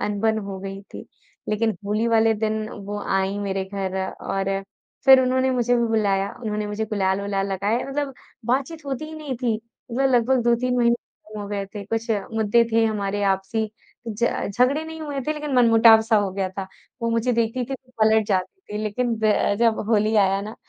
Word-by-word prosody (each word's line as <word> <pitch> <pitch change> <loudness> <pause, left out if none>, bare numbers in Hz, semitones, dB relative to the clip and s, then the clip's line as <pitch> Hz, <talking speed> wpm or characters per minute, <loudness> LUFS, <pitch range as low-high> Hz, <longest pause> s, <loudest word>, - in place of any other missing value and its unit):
अनबन 220 +2 0
हो 195 -1 -6
गई 195 0 -6
थी। - - -7 0.4
लेकिन 215 -1 0
होली 215 +3 0
वाले 225 -1 +4
दिन 215 0 -2 0.2
वो 205 0 -4 0.2
आईं 195 +1 -1
मेरे 195 -1 -2
घर 190 -1 -4
और 195 0 -2 0.4
फिर 265 -1 +9
उन्होंने 260 +1 +2
मुझे 245 -1 +2
भी 235 - +2
बुलाया। 200 -3 +1
उन्होंने 210 -2 -2
मुझे 210 +1 -2
गुलाल-वुलाल 195 -1 -1
लगाया। 205 +5 0
मतलब 275 0 -3 0.3
बातचीत 275 +5 -1
होती 275 +2 -3
ही 310 - -9
नहीं 295 -4 -5
थी। 235 -2 0 0.4
मतलब 270 +3 +2
लगभग 245 +1 +3
2-3 245 +1 +2
महीने 235 -1 +4 0.5
हो 205 - -5
गए 200 -1 -2
थे 205 - -5
कुछ 225 +3 -3 0.2
मुद्दे 220 +1 +3
थे 225 0 +4
हमारे 205 -2 -1
आपसी 215 +3 -3 0.4
ज 225 +2 0 0.3
झगड़े 270 +5 +3
नहीं 320 0 -8
हुए 290 -3 -4
थे 305 - +1
लेकिन 300 -1 -5
मनमुटाव-सा 225 -2 +6
हो 205 -2 +1
गया 190 0 -1
था। 195 - -3 0.4
वो 230 - +1
मुझे 230 +2 +1
देखती 235 +2 0
थी 270 +3 -4
तो 255 -1 -14
पलट 220 0 +4
जाती 195 - -1
थी 210 - -2
लेकिन 230 +3 -1
ब 215 -1 +5 0.3
जब 230 -1 +3
होली 215 -1 +2
आया 195 -1 +3
ना 215 +2 -7
220 Hz, 185 wpm, -23 LUFS, 205-245 Hz, 0.5 s, फिर